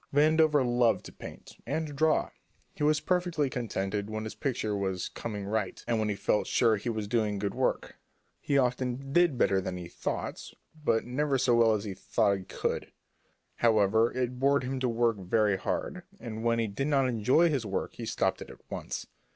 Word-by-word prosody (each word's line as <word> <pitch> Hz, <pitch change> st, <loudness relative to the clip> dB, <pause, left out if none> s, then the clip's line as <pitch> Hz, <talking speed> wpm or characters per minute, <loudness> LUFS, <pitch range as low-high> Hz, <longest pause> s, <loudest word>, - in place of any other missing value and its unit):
Vandover 150 Hz, -1 st, +4 dB
loved 120 Hz, -1 st, +2 dB
to -, -, -9 dB
paint -, -, -11 dB
and 160 Hz, 0 st, -2 dB
to 150 Hz, -, -7 dB
draw. 155 Hz, +2 st, +2 dB, 0.4 s
He -, -, -12 dB
was 150 Hz, 0 st, +3 dB
perfectly 175 Hz, -5 st, 0 dB
contented 105 Hz, -4 st, -3 dB
when 110 Hz, 0 st, -4 dB
his 110 Hz, -, -5 dB
picture 110 Hz, -6 st, -2 dB
was 95 Hz, -2 st, -2 dB
"coming 105 Hz, -3 st, -5 dB
right," 105 Hz, -1 st, -2 dB
and 115 Hz, -2 st, +1 dB
when 110 Hz, -1 st, 0 dB
he 105 Hz, -, -1 dB
felt 105 Hz, -, 0 dB
sure 115 Hz, -3 st, +3 dB
he 105 Hz, +4 st, -4 dB
was 110 Hz, -2 st, -3 dB
doing 105 Hz, -2 st, 0 dB
good 100 Hz, 0 st, -2 dB
work. -, -, -1 dB, 0.4 s
He 140 Hz, -, 0 dB
often 130 Hz, +1 st, -1 dB
did 175 Hz, -5 st, +4 dB
better 95 Hz, -5 st, +3 dB
than 90 Hz, -1 st, -4 dB
he 90 Hz, -1 st, -7 dB
thought -, -, -4 dB
he -, -, -11 dB, 0.3 s
would, -, -, -19 dB
but 115 Hz, -, +2 dB
never 135 Hz, +3 st, 0 dB
so 125 Hz, -1 st, +2 dB
well 115 Hz, -2 st, +5 dB
as 100 Hz, -, -3 dB
he 100 Hz, -3 st, -4 dB
thought 100 Hz, +1 st, +1 dB
he -, -, -9 dB
could. -, -, -3 dB, 0.7 s
However, 110 Hz, 0 st, +3 dB
it 125 Hz, -1 st, -2 dB
bored 140 Hz, +1 st, +3 dB
him 130 Hz, +1 st, -3 dB
to 130 Hz, -1 st, 0 dB
work 115 Hz, -1 st, +1 dB
very 100 Hz, +2 st, +2 dB
hard, 180 Hz, -, -3 dB, 0.2 s
and 110 Hz, -2 st, -6 dB
when 115 Hz, 0 st, +2 dB
he 115 Hz, -, +1 dB
did 110 Hz, +7 st, -3 dB
not 135 Hz, -3 st, +3 dB
enjoy 125 Hz, +8 st, +3 dB
his 140 Hz, -6 st, 0 dB
work 100 Hz, -3 st, -3 dB
he -, -, -7 dB
stopped -, -, 0 dB
it -, -, -8 dB
at -, -, -16 dB
once. -, -, -5 dB
120 Hz, 205 wpm, -29 LUFS, 105-135 Hz, 0.7 s, well